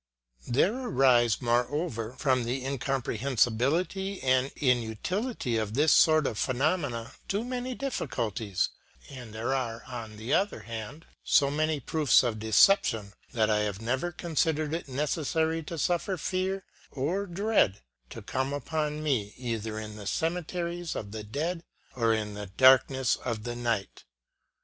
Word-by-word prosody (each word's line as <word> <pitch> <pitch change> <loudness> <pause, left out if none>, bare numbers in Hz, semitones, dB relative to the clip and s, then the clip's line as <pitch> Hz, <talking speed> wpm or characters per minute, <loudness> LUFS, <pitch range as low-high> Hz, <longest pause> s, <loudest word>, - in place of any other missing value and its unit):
There 140 - +3
arise, 125 - +3
more 120 0 +2
over, 130 -7 -3
from 130 -2 +1
the 125 +2 -3
incomprehensibility 135 - 0
and 130 +1 +2
inutility 125 - -1
of 110 0 -2
this 150 +3 +5
sort 155 -3 +5
of 110 - -2
phenomena, 130 -3 0 0.2
too 205 +3 -1
many 250 0 -3
difficulties; 110 - -2 0.4
and 125 -4 -9
there 110 +4 -2
are, 115 -4 -2
on 115 -4 -7
the 110 +5 -3
other 200 +2 +1
hand, 115 +7 -7 0.2
so 140 -1 +4
many 155 0 0
proofs 145 0 +3
of 115 -3 -1
deception, 110 - +4 0.2
that 110 -3 +2
I 105 - +3
have 105 -2 -2
never 130 +10 -1
considered 160 -2 0
it 165 -1 -3
necessary 160 +4 0
to 165 - -6
suffer 175 +4 0
fear 190 +3 -2 0.2
or 175 +9 -2
dread 190 - +1 0.3
to - - -9
come 130 +2 -2
upon 150 +1 -2
me, 115 -9 -1
either 115 -3 -3
in 105 -1 -6
the 105 -2 -7
cemeteries 170 - -2
of 100 -2 -5
the 110 0 -5
dead 160 +11 -3 0.3
or 115 -2 +2
in 105 -2 -1
the 105 0 -6
darkness 130 +4 +4
of 115 -4 -4
the 120 0 -4
night. 115 -5 -2
130 Hz, 145 wpm, -28 LUFS, 115-160 Hz, 0.4 s, this